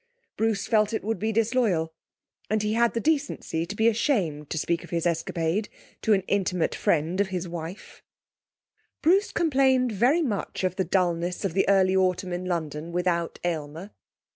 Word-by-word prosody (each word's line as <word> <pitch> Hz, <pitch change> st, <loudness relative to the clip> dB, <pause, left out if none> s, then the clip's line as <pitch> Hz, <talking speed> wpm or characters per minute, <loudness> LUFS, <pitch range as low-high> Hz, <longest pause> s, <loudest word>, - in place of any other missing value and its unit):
Bruce 220 Hz, -2 st, 0 dB
felt 215 Hz, -1 st, +2 dB
it 220 Hz, -, -2 dB
would 220 Hz, -2 st, -2 dB
be 220 Hz, +3 st, 0 dB
disloyal, 220 Hz, -8 st, +1 dB, 0.6 s
and 215 Hz, 0 st, +1 dB
he 210 Hz, 0 st, 0 dB
had 235 Hz, +1 st, +2 dB
the -, -, +1 dB
decency 280 Hz, -, -1 dB
to 205 Hz, -, -6 dB
be 220 Hz, +2 st, +3 dB
ashamed 200 Hz, -, 0 dB
to -, -, -3 dB
speak 170 Hz, +2 st, -1 dB
of -, -, -12 dB
his 170 Hz, -1 st, -1 dB
escapade 170 Hz, +3 st, -1 dB, 0.3 s
to 220 Hz, -, +3 dB
an 195 Hz, -, +3 dB
intimate 185 Hz, -4 st, 0 dB
friend 165 Hz, +5 st, +1 dB
of 200 Hz, -, +1 dB
his 185 Hz, -1 st, -4 dB
wife. 170 Hz, +2 st, -8 dB, 1.0 s
Bruce 385 Hz, +6 st, +3 dB
complained 265 Hz, -5 st, +2 dB
very 250 Hz, -, +3 dB
much 210 Hz, -7 st, -3 dB
of 185 Hz, -1 st, 0 dB
the 190 Hz, -, 0 dB
dullness 175 Hz, 0 st, 0 dB
of 185 Hz, -, -1 dB
the 195 Hz, +1 st, +2 dB
early 190 Hz, -1 st, +4 dB
autumn 185 Hz, -1 st, +1 dB
in 180 Hz, +1 st, -4 dB
London 165 Hz, -2 st, -3 dB
without 170 Hz, -1 st, -1 dB
Aylmer. 165 Hz, +3 st, -4 dB
190 Hz, 170 wpm, -26 LUFS, 170-220 Hz, 1.0 s, early